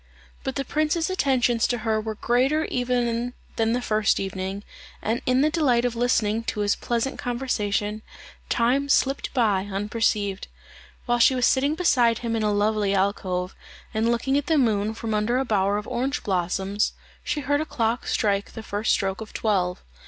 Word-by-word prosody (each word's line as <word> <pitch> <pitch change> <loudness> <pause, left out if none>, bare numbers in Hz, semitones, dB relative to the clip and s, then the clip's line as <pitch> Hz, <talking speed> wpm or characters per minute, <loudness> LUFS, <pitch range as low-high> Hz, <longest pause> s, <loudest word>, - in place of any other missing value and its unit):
But 265 - -3
the 275 - -2
prince's 310 +4 0
attentions 250 -9 +2
to 245 - -1
her 220 -1 +1
were 220 0 -4
greater 265 +8 +1
even 245 -1 -1 0.2
than 225 0 +1
the 245 0 -1
first 215 -2 +2
evening, 190 +1 -4 0.4
and 225 +3 -1
in 255 +1 +3
the 305 +2 +3
delight 255 -7 +2
of 240 -1 -1
listening 230 -2 +1
to 210 - -2
his 205 0 +2
pleasant 240 +3 -2
conversation, 215 -4 -1 0.5
time 265 +4 +1
slipped 275 0 +1
by 205 -5 +2
unperceived. 205 -1 -1 0.6
While 240 -1 +1
she 260 +2 +5
was 250 -1 +2
sitting 280 +3 +2
beside 245 -10 +3
him 230 -1 0
in 225 - 0
a 210 -1 +1
lovely 205 -1 +1
alcove, 190 -2 -1 0.4
and 220 +1 +1
looking 265 +4 +1
at 290 - -7
the 320 - +3
moon 220 -4 +1
from 225 -1 -3
under 215 +4 +1
a 265 - 0
bower 200 -3 +1
of 210 - -5
orange 255 +3 -2
blossoms, 190 +2 0 0.3
she 295 - -2
heard 290 +2 +1
a - - -2
clock 230 0 -1
strike 200 -2 0
the 225 - -7
first 205 +1 -1
stroke 195 +1 -1
of 220 - -9
twelve. 185 -5 0
230 Hz, 175 wpm, -24 LUFS, 205-255 Hz, 0.6 s, she